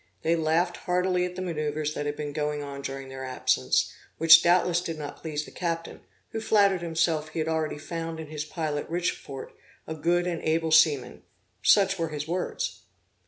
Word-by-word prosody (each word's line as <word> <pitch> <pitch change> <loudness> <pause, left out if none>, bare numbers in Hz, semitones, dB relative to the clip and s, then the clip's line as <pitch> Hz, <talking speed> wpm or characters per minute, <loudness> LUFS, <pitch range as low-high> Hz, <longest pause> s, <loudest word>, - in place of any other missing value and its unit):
They 165 +1 +3
laughed 165 +2 +1
heartily 180 0 +1
at 180 0 -6
the 185 - -4
manoeuvres 155 -3 -2
that 145 -1 -3
had 145 - -2
been 145 -1 -5
going 150 -1 -2
on 140 -1 -7
during 135 -1 -6
their 130 0 -7
absence, 125 - +1 0.2
which 165 0 +9
doubtless 175 0 +3
did 165 -2 -4
not 145 -1 -6
please 150 -2 -3
the - - -12
captain, 165 -1 -4 0.3
who 225 - -3
flattered 200 -4 +3
himself 165 -2 0
he 155 - -9
had 160 0 0
already 160 -2 -1
found 165 +1 -5
in 160 - -5
his 150 0 -5
pilot 155 -2 -3
Richefort, 165 -5 -3 0.3
a 160 - -5
good 175 +3 +1
and 175 -2 -2
able 160 0 0
seaman; 150 -6 +4 0.4
such 195 -2 +4
were 165 -1 -1
his 150 -1 -5
words. 185 - -3
160 Hz, 185 wpm, -27 LUFS, 150-175 Hz, 0.4 s, which